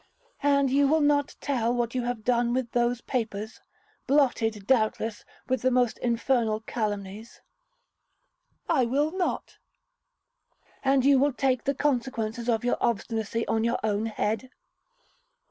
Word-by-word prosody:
'And 280 Hz, -2 st, +3 dB
you 280 Hz, +1 st, +4 dB
will 315 Hz, +3 st, +3 dB
not 290 Hz, -1 st, +2 dB
tell 240 Hz, -5 st, 0 dB
what 240 Hz, -1 st, -1 dB
you 255 Hz, -, 0 dB
have 240 Hz, -3 st, -3 dB
done 240 Hz, 0 st, +1 dB
with 255 Hz, -2 st, -2 dB
those 240 Hz, 0 st, +1 dB
papers, 220 Hz, -3 st, -4 dB, 0.5 s
blotted, 235 Hz, -7 st, +1 dB
doubtless, 220 Hz, -2 st, 0 dB, 0.2 s
with 260 Hz, 0 st, 0 dB
the 255 Hz, -, +3 dB
most 250 Hz, -2 st, +1 dB
infernal 235 Hz, -2 st, 0 dB
calumnies?' 210 Hz, -1 st, -5 dB, 1.3 s
'I 270 Hz, -7 st, +3 dB
will 290 Hz, +5 st, +1 dB
not.' 370 Hz, 0 st, -3 dB, 1.2 s
'And 270 Hz, -1 st, +3 dB
you 275 Hz, -1 st, +6 dB
will 285 Hz, +1 st, +2 dB
take 255 Hz, -1 st, 0 dB
the 280 Hz, 0 st, 0 dB
consequences 240 Hz, -4 st, -1 dB
of 230 Hz, 0 st, +1 dB
your 245 Hz, -, +1 dB
obstinacy 230 Hz, 0 st, -1 dB
on 225 Hz, 0 st, +1 dB
your 235 Hz, -, +1 dB
own 215 Hz, +1 st, 0 dB
head?' 220 Hz, +3 st, -2 dB
240 Hz, 135 wpm, -27 LUFS, 225-270 Hz, 1.3 s, you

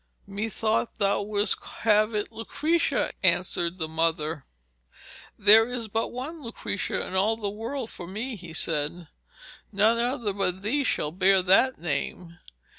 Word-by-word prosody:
'Methought 215 Hz, +3 st, -2 dB
thou 200 Hz, -1 st, +1 dB
wouldst 205 Hz, 0 st, +1 dB
have 215 Hz, 0 st, +1 dB
it 210 Hz, +1 st, -2 dB
Lucrezia,' 305 Hz, +9 st, 0 dB
answered 170 Hz, +1 st, +1 dB
the 160 Hz, -3 st, -2 dB
mother. 160 Hz, -2 st, -1 dB, 0.9 s
'There 220 Hz, +3 st, +7 dB
is 245 Hz, -2 st, -4 dB
but 225 Hz, +2 st, -1 dB
one 295 Hz, +6 st, -6 dB
Lucrezia 230 Hz, -4 st, -3 dB
in -, -, -7 dB
all 205 Hz, +4 st, +2 dB
the 205 Hz, -3 st, -3 dB
world 230 Hz, +3 st, -5 dB
for 175 Hz, -, -8 dB
me,' 225 Hz, +7 st, -4 dB
he 175 Hz, -4 st, -10 dB
said. 160 Hz, +1 st, -1 dB, 0.6 s
'None 215 Hz, +3 st, +3 dB
other 240 Hz, -4 st, 0 dB
but 190 Hz, -1 st, -2 dB
thee 280 Hz, +7 st, +1 dB
shall 150 Hz, -, 0 dB
bear 190 Hz, +2 st, +3 dB
that 230 Hz, +8 st, +4 dB
name.' 170 Hz, +2 st, -4 dB
205 Hz, 140 wpm, -26 LUFS, 180-230 Hz, 0.9 s, There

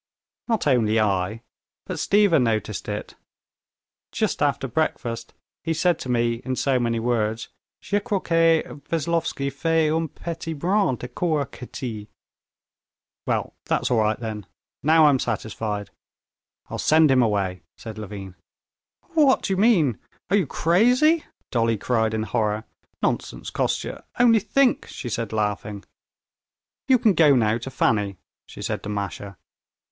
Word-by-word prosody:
"Not 225 Hz, -3 st, 0 dB
only 115 Hz, -6 st, +3 dB
I, 105 Hz, +2 st, 0 dB, 0.4 s
but -, -, -5 dB
Stiva 200 Hz, -7 st, +4 dB
noticed 110 Hz, -4 st, -1 dB
it. -, -, -5 dB, 1.0 s
Just -, -, -1 dB
after -, -, +1 dB
breakfast 115 Hz, 0 st, -2 dB, 0.3 s
he 165 Hz, 0 st, -1 dB
said 175 Hz, +1 st, +2 dB
to 130 Hz, -, -6 dB
me 120 Hz, -1 st, +1 dB
in 130 Hz, 0 st, -2 dB
so 130 Hz, 0 st, +1 dB
many 115 Hz, -1 st, 0 dB
words, 115 Hz, -1 st, -1 dB, 0.3 s
Je 205 Hz, -, 0 dB
crois 200 Hz, -1 st, -1 dB
que 165 Hz, -1 st, +3 dB, 0.3 s
Veslovsky 165 Hz, -4 st, -1 dB
fait 160 Hz, +2 st, +1 dB
un 160 Hz, +1 st, 0 dB
petit 165 Hz, +2 st, -6 dB
brin 180 Hz, 0 st, +1 dB
de 125 Hz, -, -7 dB
cour 150 Hz, +3 st, -1 dB
à -, -, -26 dB
Kitty." 115 Hz, -4 st, -7 dB, 1.2 s
"Well, -, -, -1 dB
that's -, -, 0 dB
all 120 Hz, -, +3 dB
right 110 Hz, 0 st, +1 dB
then; 110 Hz, -4 st, -5 dB, 0.3 s
now 160 Hz, +2 st, +5 dB
I'm 140 Hz, -3 st, +4 dB
satisfied. 105 Hz, -3 st, -3 dB, 0.8 s
I'll -, -, -6 dB
send 155 Hz, -2 st, +5 dB
him 130 Hz, -1 st, +5 dB
away," 100 Hz, -5 st, 0 dB, 0.2 s
said 110 Hz, -1 st, -8 dB
Levin. 100 Hz, -3 st, -7 dB, 0.8 s
"What 295 Hz, -5 st, +4 dB
do 195 Hz, -, 0 dB
you -, -, -1 dB
mean! 185 Hz, -, +3 dB, 0.3 s
Are -, -, +5 dB
you 190 Hz, -7 st, +2 dB
crazy?" 250 Hz, -, +3 dB, 0.3 s
Dolly 115 Hz, -2 st, +1 dB
cried 110 Hz, 0 st, 0 dB
in 110 Hz, -, -1 dB
horror; 110 Hz, -1 st, -1 dB, 0.4 s
"nonsense, -, -, -2 dB
Kostya, -, -, -2 dB
only 235 Hz, -2 st, +5 dB
think!" 250 Hz, +5 st, +2 dB
she 120 Hz, -, -6 dB
said, 115 Hz, -1 st, -3 dB
laughing. 105 Hz, -1 st, -2 dB, 1.0 s
"You 260 Hz, -, +6 dB
can 220 Hz, -3 st, +3 dB
go 150 Hz, -4 st, +5 dB
now 115 Hz, -2 st, +2 dB
to 120 Hz, -, -6 dB
Fanny," 105 Hz, -6 st, 0 dB, 0.3 s
she -, -, -9 dB
said -, -, -2 dB
to 105 Hz, -, -7 dB
Masha. 100 Hz, -1 st, -5 dB
125 Hz, 145 wpm, -24 LUFS, 110-165 Hz, 1.2 s, You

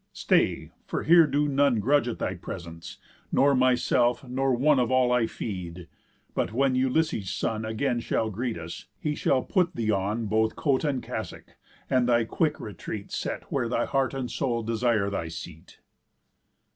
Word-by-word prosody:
Stay, -, -, +1 dB, 0.2 s
for -, -, -2 dB
here 165 Hz, 0 st, +6 dB
do 145 Hz, +1 st, +1 dB
none 140 Hz, -4 st, +2 dB
Grudge 135 Hz, +4 st, +2 dB
at 120 Hz, -, -3 dB
thy 95 Hz, -, -2 dB
presence, 85 Hz, -2 st, -8 dB, 0.3 s
nor 140 Hz, +1 st, +4 dB
myself, 125 Hz, -1 st, +2 dB
nor 135 Hz, +2 st, 0 dB
one 135 Hz, +3 st, +3 dB
Of 120 Hz, -, +1 dB
all 130 Hz, -1 st, +3 dB
I 125 Hz, -2 st, +3 dB
feed. 90 Hz, -6 st, -6 dB, 0.5 s
But -, -, -1 dB
when 135 Hz, +3 st, +2 dB
Ulysses' 130 Hz, -, +1 dB
son 110 Hz, 0 st, -2 dB
Again 120 Hz, +3 st, -1 dB
shall 110 Hz, -1 st, -1 dB
greet 115 Hz, 0 st, -3 dB
us, 85 Hz, +1 st, -8 dB
he 150 Hz, -, -1 dB
shall 130 Hz, -3 st, +1 dB
put 180 Hz, -3 st, +1 dB
thee 110 Hz, -2 st, 0 dB
on 105 Hz, +3 st, -1 dB
Both 110 Hz, +1 st, +1 dB
coat 140 Hz, -2 st, +1 dB
and 140 Hz, -4 st, -1 dB
cassock, -, -, -7 dB, 0.3 s
and 125 Hz, -1 st, +2 dB
thy 120 Hz, -1 st, +4 dB
quick 150 Hz, +7 st, 0 dB
retreat 105 Hz, 0 st, -7 dB
Set -, -, -3 dB
where 125 Hz, -4 st, 0 dB
thy -, -, 0 dB
heart 135 Hz, 0 st, 0 dB
and 130 Hz, -3 st, -3 dB
soul 120 Hz, -4 st, -1 dB
desire 115 Hz, -3 st, +1 dB
thy 85 Hz, -4 st, -3 dB
seat." 80 Hz, +2 st, -10 dB
120 Hz, 170 wpm, -27 LUFS, 110-135 Hz, 0.5 s, here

